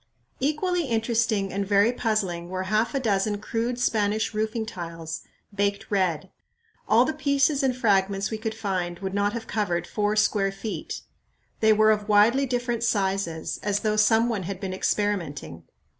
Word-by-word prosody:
Equally 320 +5 0
interesting 225 -4 0
and 200 +1 -1
very 200 +3 +3
puzzling 200 -8 -1
were 185 0 -3
half 215 +7 0
a - - +2
dozen 205 -3 0
crude 235 +3 -2
Spanish 215 -2 +1
roofing 220 +1 -1
tiles, 165 -5 -6 0.3
baked 200 0 0
red. 185 -3 0 0.6
All 230 +3 +6
the 315 - -1
pieces 280 0 +2
and 260 -2 +1
fragments 195 -3 +1
we 220 - -3
could 220 0 -3
find 185 -5 -2
would 190 0 -5
not 205 +1 +1
have 230 -1 -5
covered 180 -7 -1
four 210 +2 -1
square 205 -2 +2
feet. 200 +2 -5 0.6
They 220 0 +5
were 215 0 +5
of 210 0 -1
widely 230 +7 +4
different 240 -2 -1
sizes, 195 -7 -1
as 205 0 0
though 215 -1 +1
some 220 +2 +4
one 225 -5 -1
had 185 +1 -5
been 190 -2 -4
experimenting. 175 - -2
210 Hz, 160 wpm, -25 LUFS, 195-230 Hz, 0.6 s, All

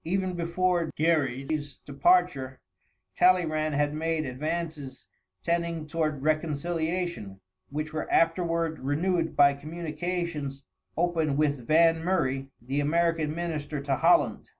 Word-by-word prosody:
Even 185 +2 -1
before 175 0 0
Gerry's 145 -2 0
departure, 140 -3 +1 0.6
Talleyrand 155 -4 +3
had 145 0 +1
made 160 0 -1
advances 150 0 -4 0.4
tending 170 -2 -1
toward 155 -3 -2
reconciliation, 160 - -2 0.3
which 150 +2 -4
were 155 - -4
afterward 165 -1 +1
renewed 165 +5 0
by 140 -1 +6
communications 155 -1 -4 0.3
opened 160 -4 +1
with 145 -5 0
Van 165 +1 +4
Murray, 135 -7 0
the 130 +4 -3
American 160 0 +1
minister 155 -4 -3
to 140 -1 -1
Holland. 345 - +3
155 Hz, 105 wpm, -27 LUFS, 145-170 Hz, 0.6 s, by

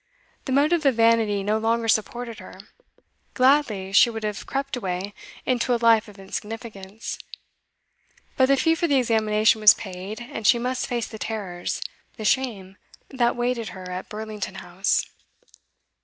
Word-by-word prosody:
The 265 - -3
motive 305 +5 +3
of 265 - +3
vanity 225 -3 +3
no 210 +2 +1
longer 230 +1 0
supported 230 +1 -1
her; - - -12 0.8
gladly 255 -8 +2
she 215 +4 +6
would 220 -1 -6
have 210 -1 -4
crept 275 +1 -2
away 195 -3 -4 0.3
into 250 -1 +1
a - - +1
life 230 -2 +4
of 210 -1 -14
insignificance; 210 +1 -7 1.2
but 260 - +4
the 275 0 +4
fee 325 +4 +3
for 335 +1 0
the 285 - +2
examination 220 -2 +2
was 215 - +9
paid, 190 +2 -7
and 240 -3 -4
she 245 - +6
must 250 +1 -2
face 240 -2 -2
the 220 - -10
terrors, 195 -6 -4 0.3
the 215 - -6
shame, 210 -7 -1 0.3
that 240 -3 +1
waited 240 -2 -1
her 185 -1 -8
at 180 +1 -6
Burlington 215 -2 -6
House. 180 +1 0
225 Hz, 155 wpm, -24 LUFS, 205-245 Hz, 1.2 s, was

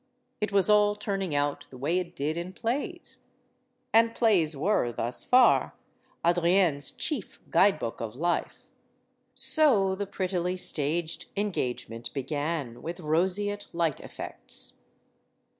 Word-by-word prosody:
It 210 -1 -2
was 195 -2 +5
all 210 -1 +4
turning 195 -6 -3
out 145 0 -1
the 130 - -12
way 160 +8 0
it 175 -1 -6
did 150 +3 -2
in 175 +2 -5
plays. 280 - -4 0.7
And 230 +1 +4
plays 175 - +2
were, 155 -6 +1
thus 120 +1 -2
far, 255 0 +4 0.5
Adrienne* 175 -2 +3
s 145 - 0
chief 275 - -4
guidebook 165 - +2
of 115 0 -5
life. 170 +5 -2 0.7
So 230 - +5
the 200 +1 -4
prettily 185 -1 -2
staged 160 0 -1
engagement 125 - -3
began; 145 -3 -3
with 170 +2 -6
roseate 190 +6 0
light 170 -3 0
effects. - - -5
175 Hz, 125 wpm, -28 LUFS, 150-205 Hz, 0.7 s, was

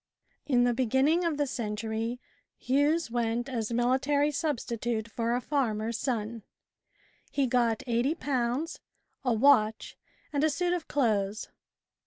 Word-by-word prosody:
IN 245 -4 +4
the 245 0 +3
beginning 265 +8 +2
of 330 -4 0
the 290 - +1
century, 225 0 -3 0.4
Hughes 285 +2 +1
went 235 0 -1
as 235 -4 -3
military 265 +5 +2
substitute 235 -7 -2
for 230 +1 -1
a 250 - -1
farmer's 230 -5 -1
son. 230 -3 -2 0.9
He 280 - +1
got 235 -3 +1
;8o, 260 +3 -1 0.4
a 250 -3 +2
watch, 220 -3 +3 0.4
and 285 0 +1
a 315 - +4
suit 350 +4 0
of 350 -3 -3
clothes. 215 -6 0
245 Hz, 125 wpm, -29 LUFS, 230-285 Hz, 0.9 s, IN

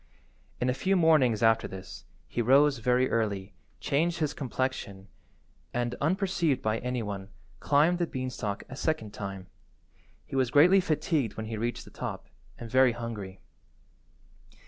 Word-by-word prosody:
In 125 - 0
a 125 - +2
few 190 +9 +1
mornings 150 - +4
after 115 0 +4
this, 95 -1 -9 0.2
he 120 - -2
rose 135 +3 +4
very 125 +2 +2
early, 100 -3 -1 0.3
changed 165 +5 0
his 155 -3 -1
complexion, 125 -7 -3 0.7
and, 120 0 -1
unperceived 175 -3 +1
by 110 +1 -1
any 125 -1 -2
one, 100 -2 -6 0.3
climbed 155 +5 +3
the 175 - +1
beanstalk 125 -7 -4
a 130 - -8
second 135 -8 -2
time. 95 -2 -6 0.8
He - - -8
was 130 -2 +2
greatly 175 +9 +6
fatigued 155 - -1
when 110 - -4
he 110 +1 -4
reached 120 +3 -3
the - - -14
top, - - -6 0.3
and 120 - -7
very 130 +1 +4
hungry. 105 -5 -6
125 Hz, 145 wpm, -28 LUFS, 110-145 Hz, 0.8 s, greatly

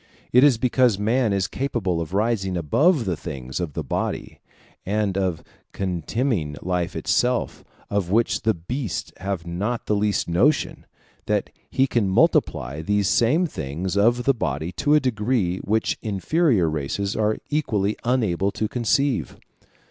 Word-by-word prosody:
It 125 +2 +7
is 140 -5 +6
because 125 -3 +3
man 115 +2 +1
is 100 -2 +1
capable 110 -11 -2
of 80 0 -5
rising 100 -4 0
above 135 - +2
the 90 - 0
things 65 -4 -6
of 85 -5 -3
the 80 - -3
body, 65 - -3 0.4
and 100 -1 0
of 95 -4 -1 0.3
contemning 95 - -1
life 90 -1 -1
itself, 125 -1 0 0.2
of 100 -4 -1
which 115 +4 +2
the 110 -1 +1
beasts 110 - -4
have 95 -3 -4
not 100 +8 -3
the 105 - +1
least 105 0 0
notion, 120 - +1 0.4
that - - 0 0.2
he 135 - +2
can 115 -7 0
multiply 70 -6 +2
these 100 +3 +1
same 150 +10 +3
things 85 - -4
of 120 +4 +3
the 135 - +3
body 80 - -3
to 145 +9 +2
a - - +6
degree 110 -7 0
which 110 +2 0
inferior 110 - +1
races 80 +7 -2
are 110 0 +1
equally 110 -9 0
unable 105 -7 +1
to 110 - -1
conceive. 125 +4 0
105 Hz, 150 wpm, -23 LUFS, 90-120 Hz, 0.4 s, It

